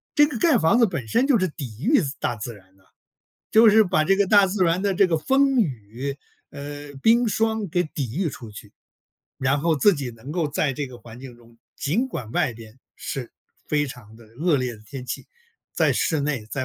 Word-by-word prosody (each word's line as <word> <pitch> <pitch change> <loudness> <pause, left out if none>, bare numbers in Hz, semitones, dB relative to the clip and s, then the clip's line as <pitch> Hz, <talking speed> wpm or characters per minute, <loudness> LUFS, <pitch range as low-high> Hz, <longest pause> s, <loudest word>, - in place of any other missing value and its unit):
这 295 - +7
个 285 -6 -5
盖 300 -1 +4
房 165 +6 +3
子 235 - +6
本 140 -11 -5
身 250 - +2
就 265 -6 +4
是 185 - +1
抵 130 -8 -8
御 275 +5 +4
自 140 -4 -3
大 120 - -1
自 115 +2 -6
然 95 -1 -21
的， 95 - -28 0.7
就 225 +1 +7
是 215 0 +6
把 175 -4 +1
这 195 +5 +3
个 200 0 +2
大 200 0 +6
自 190 0 0
然 170 +1 +1
的 200 -1 +1
这 195 +1 +4
个 165 -3 0
风 270 - +2
雨， 130 - -4 0.3
呃， 145 0 -8
冰 235 +1 +4
霜 220 -1 0
给 175 +2 +1
抵 135 -5 -5
御 180 -2 0
出 115 -5 -9
去。 105 0 -12 0.7
然 140 +2 +1
后 165 0 +2
自 205 +8 +4
己 140 -7 -4
能 115 +5 -11
够 165 -1 0
在 145 -1 0
这 140 +2 -4
个 125 -1 -12
环 115 0 -13
境 125 -2 -11
中， 115 -1 -21 0.2
尽 205 - 0
管 125 - -6
外 145 -1 0
边 115 +1 -14 0.2
是 130 -3 -5 0.4
非 145 -1 +1
常 115 -4 -12
的 115 0 -16 0.2
恶 165 -2 +3
劣 125 -2 -2
的 105 - -18
天 135 -3 -8
气， 125 - -6 0.5
在 - - +3
室 155 -3 0
内 140 -3 -1
在、 120 +5 -4
145 Hz, 240 characters per minute, -23 LUFS, 125-195 Hz, 0.7 s, 这